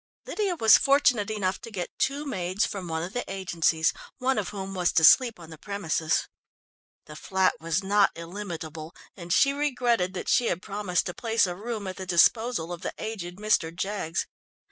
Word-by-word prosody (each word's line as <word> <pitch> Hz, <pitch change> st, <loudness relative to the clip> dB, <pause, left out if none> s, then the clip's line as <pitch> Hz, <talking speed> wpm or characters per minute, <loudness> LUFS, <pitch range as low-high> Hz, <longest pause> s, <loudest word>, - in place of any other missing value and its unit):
Lydia 400 Hz, -4 st, -1 dB
was 225 Hz, -9 st, +6 dB
fortunate 250 Hz, -7 st, +3 dB
enough 195 Hz, -4 st, -2 dB
to -, -, -8 dB
get 185 Hz, -5 st, -6 dB
two 280 Hz, +2 st, 0 dB
maids 185 Hz, -6 st, -1 dB
from 190 Hz, -3 st, -5 dB
one 160 Hz, 0 st, -2 dB
of 180 Hz, +3 st, -6 dB
the 245 Hz, -, -2 dB
agencies, 170 Hz, -4 st, +1 dB, 0.2 s
one 260 Hz, -2 st, +1 dB
of 200 Hz, -, -3 dB
whom 195 Hz, -1 st, -6 dB
was 180 Hz, -2 st, +1 dB
to 160 Hz, -, +2 dB
sleep 235 Hz, +5 st, +6 dB
on 165 Hz, -1 st, -12 dB
the 160 Hz, -, -11 dB
premises. 165 Hz, -6 st, -1 dB, 0.8 s
The 150 Hz, -, -11 dB
flat 190 Hz, +3 st, +1 dB
was 165 Hz, +3 st, -1 dB
not 200 Hz, +1 st, +4 dB
illimitable, 165 Hz, -3 st, -7 dB, 0.2 s
and 175 Hz, -2 st, -9 dB
she 275 Hz, +9 st, +4 dB
regretted 245 Hz, -10 st, 0 dB
that -, -, -5 dB
she 240 Hz, -, +3 dB
had 170 Hz, -, -1 dB
promised 200 Hz, -3 st, -1 dB
to 180 Hz, -, -4 dB
place 230 Hz, +1 st, +1 dB
a 180 Hz, -, -3 dB
room 215 Hz, +1 st, -5 dB
at 185 Hz, -1 st, -6 dB
the 190 Hz, -1 st, -7 dB
disposal 180 Hz, 0 st, +2 dB
of 175 Hz, -, -8 dB
the -, -, -5 dB
aged 190 Hz, -5 st, -6 dB
Mr. 210 Hz, -6 st, +1 dB
Jaggs. 185 Hz, -1 st, -3 dB
195 Hz, 190 wpm, -26 LUFS, 175-225 Hz, 0.8 s, was